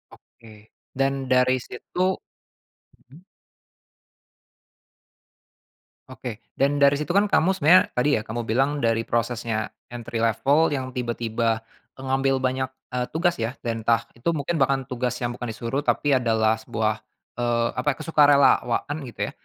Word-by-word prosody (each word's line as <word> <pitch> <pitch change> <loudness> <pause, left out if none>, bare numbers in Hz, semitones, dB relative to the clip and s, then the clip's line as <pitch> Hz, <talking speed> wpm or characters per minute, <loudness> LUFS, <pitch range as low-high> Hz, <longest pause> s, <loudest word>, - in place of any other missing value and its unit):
Oke, 115 -2 -18 0.4
dan 135 -1 0
dari 130 0 +4
situ 185 +10 -2 0.7
mhm. 135 +5 -20 2.9
Oke 125 -4 -7 0.2
dan 140 +1 +1
dari 140 0 +5
situ 150 +4 -3
kan 200 +2 +3
kamu 190 +1 +3
sebenarnya 185 0 +6
tadi 125 +4 +1
ya - - -2
kamu 120 +2 -4
bilang 135 +6 0
dari 115 0 +1
prosesnya 115 -2 -2 0.2
entry 120 -1 -5
level 140 +8 +2
yang 130 -2 -3
tiba-tiba, 115 -2 -1 0.4
mengambil 135 0 0
banyak, 130 0 0 0.2
eee, 125 -1 -2
tugas 175 +2 +1
ya 115 +1 -2
dan 115 -2 -4
entah 115 -1 +2
itu 120 - -24
mungkin 160 +2 -2
bahkan 135 -2 +1
tugas 125 -1 -2
yang 120 0 -3
bukan 125 - -5
disuruh 120 +6 -3
tapi 145 -2 +2
adalah 110 -2 +2
sebuah, 110 0 -2 0.4
eee, 120 -1 +1
apa 125 - +1
ya - - -17
kesukarelawan 145 -3 +3
gitu 120 - -12
ya, - - -10
125 Hz, 140 wpm, -24 LUFS, 115-140 Hz, 2.9 s, sebenarnya